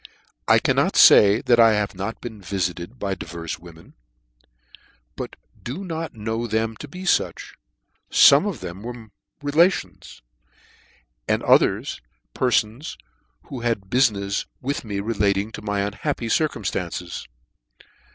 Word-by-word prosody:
I - - +6
cannot - - +1
fay 100 +1 +7
that 120 -1 +3
I 115 -2 +6
l\ave 105 -1 -2
not 100 +5 -5
been 110 -4 -8
vifited 90 +3 -3
by 100 -4 -2
divers 85 -3 -6
women; 85 -1 -15 1.2
but - - -6 0.3
do 140 +11 -6
not 165 -5 -5
know 110 +2 -3
them 110 +1 -1
to 150 - -8
be 180 +6 -9
fuch: 190 - 0 0.6
fome 145 +9 +6
of 160 - -7
them 90 +1 -7
were 115 -2 -9 0.3
relations, 160 - 0 1.0
and - - 0
other - - +4 0.5
perfons, 125 +2 0 0.5
who 135 - -8
had 115 -5 -2
bu 125 - +2
finefs 100 -6 +1
with 140 +2 -3
me 100 -3 -4
relating 100 -1 0
to - - -8
my 105 -1 -1
unhappy 100 +3 -3
circuiu 145 -3 0
itances. 90 -2 -4
110 Hz, 130 wpm, -23 LUFS, 100-125 Hz, 1.2 s, fay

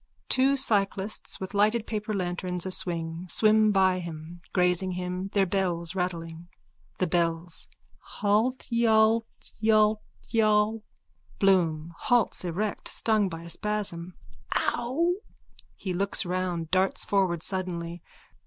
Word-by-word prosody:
(Two 270 +2 +3
cyclists, 205 -5 0
with 190 +1 -6
lighted 215 +3 +2
paper 215 -1 -4
lanterns 180 -2 -2
aswing, 170 -2 -1
swim 215 +1 +4
by 190 -2 +3
him, 170 0 -8
grazing 180 0 +2
him, 180 +1 -4
their 200 -2 +3
bells 175 -3 -1
rattling.) 170 -2 -4 0.5
THE 185 - +1
BELLS: 170 0 -1 0.5
Haltyaltyaltyall. 220 -1 +1 0.6
BLOOM: 170 -4 +2
(Halts 240 -5 +2
erect, 195 +4 -3
stung 215 -3 +2
by 165 -1 -7
a 170 - -9
spasm.) 185 -3 -2 0.4
Ow! 320 +10 0 0.6
_(He 185 -3 -3
looks 200 +1 +1
round, 180 -2 -2
darts 190 +1 +2
forward 185 -4 +1
suddenly. 175 -3 -3
190 Hz, 105 wpm, -27 LUFS, 175-215 Hz, 0.6 s, swim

